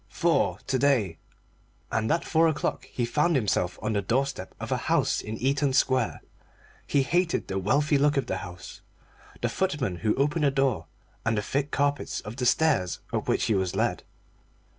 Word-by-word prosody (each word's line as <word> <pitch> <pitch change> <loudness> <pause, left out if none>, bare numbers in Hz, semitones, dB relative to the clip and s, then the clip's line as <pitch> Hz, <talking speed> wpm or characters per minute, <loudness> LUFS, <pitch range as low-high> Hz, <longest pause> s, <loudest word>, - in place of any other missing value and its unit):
"Four 170 -4 +1
to 130 - 0
day." 120 -11 +2 0.7
And 110 0 0
at 165 - +1
four 165 0 +3
o'clock 155 - -1
he 120 - -2
found 150 +7 +1
himself 100 -7 0
on 110 - 0
the 100 - +1
doorstep 125 -1 -2
of - - -6
a - - +2
house - - +2
in 110 +1 -5
Eaton 135 +1 +1
Square. 130 -3 +1 0.6
He 140 - +2
hated 175 +4 0
the 95 - -2
wealthy 145 - +2
look 145 +1 +3
of 135 - +1
the 95 - -2
house, 90 0 -9 0.6
the - - +3
footman 145 - -1
who 105 +3 0
opened 150 +3 +1
the - - +5
door, 135 -4 0 0.4
and 115 -1 +1
the 105 - 0
thick 140 +5 -1
carpets 145 0 0
of 105 +2 -8
the 125 -2 +1
stairs 135 - +2 0.2
up - - -1
which - - +1
he 110 - +2
was 95 -3 0
led. - - 0
135 Hz, 185 wpm, -27 LUFS, 105-145 Hz, 0.7 s, the